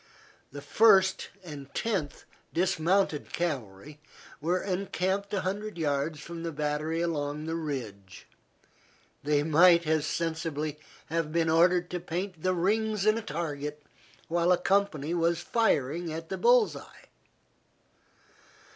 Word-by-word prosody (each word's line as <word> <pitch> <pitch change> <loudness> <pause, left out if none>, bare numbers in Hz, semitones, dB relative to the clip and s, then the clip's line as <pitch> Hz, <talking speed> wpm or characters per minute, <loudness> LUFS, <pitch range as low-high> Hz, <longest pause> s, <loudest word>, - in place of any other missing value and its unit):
The 145 +1 -8
First 195 +4 +4
and 145 -5 -9
Tenth 185 -11 -2 0.3
dismounted 180 -2 +1
Cavalry 140 - -4 0.4
were 175 +4 +1
encamped 195 +1 -2
a 200 -2 0
hundred 205 +2 -4
yards 150 0 -1
from 170 +1 -7
the 165 0 -3
battery 150 +2 -2
along 150 -3 -2
the 160 - -3
ridge. 115 - -6 1.0
They 145 0 +1
might 170 +2 +5
as 155 -1 +1
sensibly 160 -2 -3 0.3
have 165 -2 -1
been 165 0 +1
ordered 175 +2 +3
to 180 - -2
paint 175 0 -5
the 185 +1 +1
rings 210 +3 0
in 215 0 +4
a 230 - -2
target 150 -4 -5 0.4
while 170 +1 +2
a 180 - +5
company 180 -5 0
was 170 0 +1
firing 170 - 0
at 160 +1 -6
the 190 - -3
bull's 480 -2 +4
eye. - - -13
165 Hz, 130 wpm, -28 LUFS, 150-185 Hz, 1.0 s, might